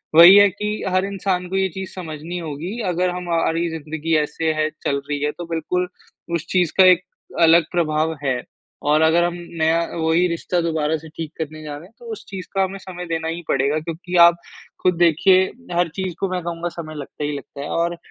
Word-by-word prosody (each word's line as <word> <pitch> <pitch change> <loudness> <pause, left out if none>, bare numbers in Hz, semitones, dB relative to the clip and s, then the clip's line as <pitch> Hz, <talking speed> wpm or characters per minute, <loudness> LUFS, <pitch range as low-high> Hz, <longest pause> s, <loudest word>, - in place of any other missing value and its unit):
वही 170 +4 +10
है 205 0 +8
कि 210 +3 -5 0.2
हर 185 +1 +1
इंसान 190 -2 -2
को 190 - -3
ये 190 0 +2
चीज़ 190 +3 -6
समझनी 165 -1 -6
होगी 165 +7 -5
अगर 180 +1 +1
हमारी 170 -1 0
ज़िंदगी 160 0 -2
ऐसे 160 +2 0
है 155 0 0
चल 140 - +1
रही 145 -1 -1
है 150 - +1
तो 175 - -5
बिल्कुल 170 +2 -1 0.5
उस 170 +1 -3
चीज़ 180 -4 +2
का 190 - +8
एक 180 -1 +3 0.4
अलग 165 +1 +7
प्रभाव 160 -2 +1
है 130 -2 0 0.5
और 155 +1 +4
अगर 160 +2 +4
हम 175 0 0 0.3
नया, 160 +1 +3 0.2
वही 165 +2 +2
रिश्ता 170 +1 -1
दोबारा 160 -1 0
से 160 +1 -12
ठीक 160 0 -7
करने 155 -1 -5
जा 150 -1 -6
रहे 160 - -12
हैं 225 - -27
तो 480 - -14
उस 435 - -7
चीज़ 190 -3 -7
का 195 -1 +2
हमें 190 +1 -3
समय 180 -1 -8
देना 165 -1 -2
ही 165 +1 -3
पड़ेगा। 140 +3 +1
क्योंकि 170 +3 -6
आप 170 - +3 0.5
ख़ुद 180 -1 +3
देखिए, 175 +3 +5 0.3
हर 175 0 +2
चीज़ 190 -2 -3
को 195 - -1
मैं 180 - -1
कहूँगा 170 0 -3
समय 155 -2 -8
लगता 150 +1 -7
ही 145 - -1
लगता 140 - -10
है 145 - -5
और 170 0 -1
170 Hz, 210 wpm, -21 LUFS, 155-180 Hz, 0.5 s, वही